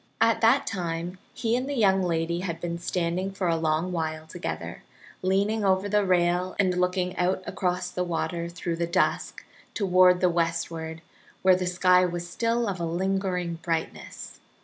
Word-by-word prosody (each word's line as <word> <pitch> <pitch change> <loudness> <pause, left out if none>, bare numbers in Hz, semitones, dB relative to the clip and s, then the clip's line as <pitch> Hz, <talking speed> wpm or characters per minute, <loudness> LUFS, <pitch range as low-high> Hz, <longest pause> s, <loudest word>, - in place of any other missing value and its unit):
At 225 0 +3
that 235 +5 +4
time 175 -1 -4
he 230 0 -1
and 255 +3 -2
the 285 - -2
young 195 -5 +3
lady 170 -1 0
had 170 -3 -4
been 170 -1 -4
standing 175 +2 -1
for 190 -1 -2
a 165 - +2
long 160 +2 0
while 160 -2 -3
together, 170 +3 -6 0.4
leaning 200 +4 +1
over 190 0 +2
the 210 0 +2
rail 180 0 +1
and 185 -2 +2
looking 180 0 0
out 185 +1 0
across 180 -1 -2
the 180 0 -1
water 170 0 -2
through 170 -1 -4
the 170 0 -1
dusk 185 +2 0 0.3
toward 185 -2 +5
the 180 - +3
westward, 165 -1 -2 0.4
where 185 -1 +6
the 180 0 -2
sky 180 0 +4
was 175 -1 -2
still 230 +5 0
of 190 -3 -3
a - - -2
lingering 180 0 -1
brightness. 165 -1 -4
180 Hz, 170 wpm, -26 LUFS, 170-190 Hz, 0.4 s, where